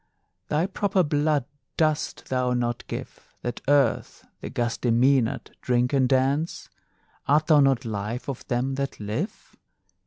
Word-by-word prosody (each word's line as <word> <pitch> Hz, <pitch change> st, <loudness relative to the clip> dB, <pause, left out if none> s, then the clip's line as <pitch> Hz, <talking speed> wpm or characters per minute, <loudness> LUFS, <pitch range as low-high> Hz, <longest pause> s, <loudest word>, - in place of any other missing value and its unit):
Thy 150 Hz, +3 st, +1 dB
proper 195 Hz, -1 st, +1 dB
blood 150 Hz, -2 st, +1 dB, 0.3 s
dost 155 Hz, -2 st, 0 dB
thou 125 Hz, -1 st, +1 dB
not 120 Hz, -1 st, -2 dB
give, -, -, -8 dB
That 120 Hz, -, -4 dB
Earth, 140 Hz, -4 st, +2 dB
the -, -, -6 dB
gusty 120 Hz, +1 st, -1 dB
Mænad, 125 Hz, 0 st, +2 dB
drink 125 Hz, +1 st, +1 dB
and 130 Hz, -2 st, +3 dB
dance? 140 Hz, +5 st, 0 dB, 0.6 s
Art 150 Hz, +2 st, +4 dB
thou 155 Hz, -2 st, +5 dB
not 135 Hz, -4 st, +3 dB
life 110 Hz, +2 st, -4 dB
of 135 Hz, -3 st, -6 dB
them 125 Hz, +2 st, 0 dB
that 135 Hz, 0 st, -4 dB
live? 110 Hz, -, -5 dB
135 Hz, 135 wpm, -25 LUFS, 120-150 Hz, 0.6 s, thou